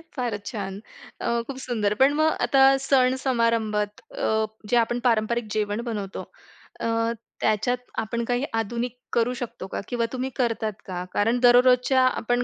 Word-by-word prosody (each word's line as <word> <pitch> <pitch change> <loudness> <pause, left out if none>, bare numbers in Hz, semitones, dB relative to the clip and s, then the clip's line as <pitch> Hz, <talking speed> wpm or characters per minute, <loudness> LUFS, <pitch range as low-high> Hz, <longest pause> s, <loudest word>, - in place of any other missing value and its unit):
फारच 230 -6 -3
छान! 200 -3 -5 0.4
अ, 235 0 0
खूप 270 -2 -6
सुंदर. 210 -4 0
पण 270 +4 +4
मग 315 0 +4
आता 270 -1 +3 0.2
सण 260 -1 +4
समारंभात 225 -5 0
अ, 220 - 0 0.2
जे 245 - +2
आपण 240 +1 +1
पारंपरिक 230 0 +1
जेवण 210 +1 -1
बनवतो 200 -3 -4 0.6
अ, - - -1 0.5
त्याच्यात 220 +4 +1 0.3
आपण 235 +2 -3
काही 245 +3 0 0.2
आधुनिक 235 +3 -4 0.2
करू 240 +1 +2
शकतो 215 -5 -6
का? - - -2
किंवा 235 -1 0
तुम्ही 260 +1 -2
करतात 225 -3 -1
का? 180 -1 -4
कारण 230 +4 +2
दररोजच्या 250 +1 +5 0.2
आपण 245 +1 +1
235 Hz, 150 wpm, -25 LUFS, 215-250 Hz, 0.6 s, दररोजच्या